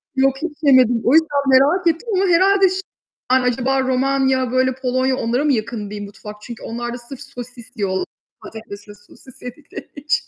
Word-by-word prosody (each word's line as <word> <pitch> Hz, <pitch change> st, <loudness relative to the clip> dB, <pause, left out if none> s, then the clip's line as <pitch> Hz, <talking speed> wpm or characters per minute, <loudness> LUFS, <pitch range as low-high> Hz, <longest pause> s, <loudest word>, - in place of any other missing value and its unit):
Yok, 270 Hz, 0 st, +2 dB
hiç 320 Hz, -2 st, -5 dB
yemedim, 255 Hz, -5 st, +4 dB
o 250 Hz, -, +3 dB
yüzden 300 Hz, -3 st, +3 dB
merak 295 Hz, +8 st, +4 dB
ettim 335 Hz, +8 st, 0 dB
ama 380 Hz, -, +2 dB
herhâlde 380 Hz, +2 st, +4 dB
şey, 375 Hz, +1 st, -3 dB, 0.5 s
acaba 260 Hz, +1 st, +1 dB
Romanya, 260 Hz, 0 st, +1 dB
böyle 255 Hz, 0 st, +1 dB
Polonya 255 Hz, 0 st, 0 dB
onlara 240 Hz, +4 st, -1 dB
mı 295 Hz, -2 st, +2 dB
yakın 215 Hz, -2 st, -3 dB
diyeyim 205 Hz, 0 st, -6 dB
mutfak? 210 Hz, +1 st, -10 dB
Çünkü 235 Hz, +1 st, -10 dB
onlar 240 Hz, +1 st, -5 dB
da -, -, -5 dB
sırf 245 Hz, +2 st, -11 dB
sosis 245 Hz, -2 st, -11 dB
diyorlar. 190 Hz, -3 st, -1 dB, 0.4 s
Patates 210 Hz, -2 st, -10 dB
ve 205 Hz, -, -11 dB
sosis 210 Hz, +5 st, -19 dB
yedikleri 250 Hz, +4 st, -10 dB
için. 290 Hz, +2 st, -1 dB
260 Hz, 175 wpm, -19 LUFS, 235-280 Hz, 0.5 s, yemedim